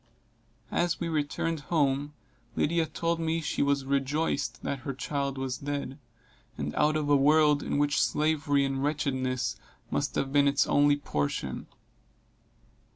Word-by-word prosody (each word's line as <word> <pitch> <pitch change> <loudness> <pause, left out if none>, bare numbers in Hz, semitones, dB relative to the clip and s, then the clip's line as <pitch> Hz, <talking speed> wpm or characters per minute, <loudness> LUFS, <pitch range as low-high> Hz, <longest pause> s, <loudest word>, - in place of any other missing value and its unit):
As 175 0 0
we 170 - -2
returned 160 +1 -1
home, 145 -2 +1 0.4
Lydia 165 +1 +1
told 170 +1 -1
me 165 0 0
she 155 - -2
was 140 -1 +1
rejoiced 140 -2 -1
that 140 - -2
her 135 0 -5
child 140 0 -2
was 130 -1 -3
dead, 140 -1 -4 0.6
and 75 +1 -3
out 150 +1 +2
of 155 -1 0
a 145 - +5
world 150 +1 +4
in - - -2
which 145 0 +2
slavery 150 -2 +2
and 135 0 -2
wretchedness 130 -4 -1 0.3
must - - -1
have 135 0 -1
been 145 -1 +5
its 140 0 +3
only 145 0 +4
portion. 70 - -3
145 Hz, 145 wpm, -28 LUFS, 135-155 Hz, 0.6 s, a